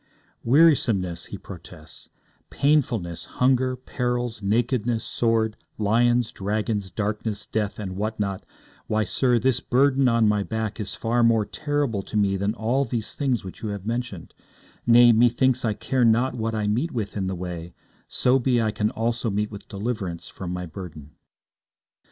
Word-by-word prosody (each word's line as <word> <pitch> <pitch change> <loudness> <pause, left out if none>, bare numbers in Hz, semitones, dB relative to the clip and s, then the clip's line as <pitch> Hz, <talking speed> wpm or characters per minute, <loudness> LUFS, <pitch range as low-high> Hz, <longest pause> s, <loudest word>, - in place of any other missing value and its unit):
'Wearisomeness,' 115 - +3
he 100 - -7
protests, 85 -4 -12 0.4
'painfulness, 120 - 0
hunger, 130 0 +3
perils, 120 -2 -3
nakedness, 115 +2 0
sword, 110 -2 +1 0.2
lions, 120 +2 +2
dragons, 105 0 -2
darkness, 105 +2 -3
death, 105 -2 -2
and 95 -3 -5
what 110 +2 -3
not 100 -2 -2 0.4
why, 110 0 +1
sir, 125 +4 +2
this 130 +1 +2
burden 135 +1 +3
on 115 -2 +3
my 105 -1 +2
back 110 +1 -3
is 100 -2 -4
far 120 +1 0
more 115 -2 +4
terrible 145 -5 -1
to 105 - -5
me 100 -2 +2
than 100 +3 -1
all 120 +5 +1
these 115 -3 -3
things 130 -6 -1
which 95 - -9
you 110 - -3
have 100 -2 -5
mentioned; 115 -6 -4 0.5
nay, 120 0 +8
methinks 120 +3 +3
I 110 -3 +1
care 130 +4 0
not 120 +3 +3
what 115 -2 -2
I 105 -1 -1
meet 120 +11 0
with 110 -7 -4
in 95 -2 -1
the 95 - -2
way, 85 -1 -6 0.3
so 130 +2 +2
be 125 -1 +2
I 110 -1 +1
can 105 0 0
also 115 +1 -1
meet 105 +1 -1
with 105 -1 -10
deliverance 100 -5 -4
from 90 -2 -7
my 90 0 -4
burden.' 80 -4 -9
110 Hz, 160 wpm, -24 LUFS, 100-120 Hz, 0.5 s, nay